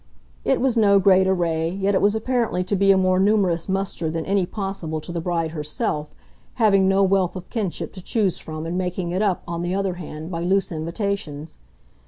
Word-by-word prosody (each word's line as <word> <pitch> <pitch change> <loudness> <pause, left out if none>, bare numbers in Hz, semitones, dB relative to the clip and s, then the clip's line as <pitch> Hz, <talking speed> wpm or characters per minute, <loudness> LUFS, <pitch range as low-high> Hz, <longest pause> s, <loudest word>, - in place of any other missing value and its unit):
It 270 - +2
was 260 -1 +1
no 205 -3 +5
great 190 -1 +5
array, 165 -3 +1
yet 195 +2 0
it 190 - +2
was 205 +1 +3
apparently 230 -5 0
to 190 +3 -1
be 195 +1 +3
a 195 - +5
more 185 0 +2
numerous 195 -4 +2
muster 190 -4 -1
than 160 0 -3
any 195 -2 +1
possible 195 -6 -4
to 155 +3 -8
the 170 -1 -3
bride 165 -2 -1
herself, 150 -1 -3 0.4
having 200 -5 +4
no 195 +1 +3
wealth 190 -2 +2
of 185 -1 -8
kinship 185 -8 -3
to 185 - -9
choose 200 -1 0
from 155 0 -6
and 175 +2 -2
making 180 -1 -2
it 185 +3 -1
up, 200 -4 0
on 170 -1 -3
the 175 +2 -1
other 195 -2 0
hand, 160 -1 -8
by 165 -1 -3
loose 190 +2 +1
invitations. 165 -2 -4
185 Hz, 205 wpm, -23 LUFS, 170-195 Hz, 0.4 s, no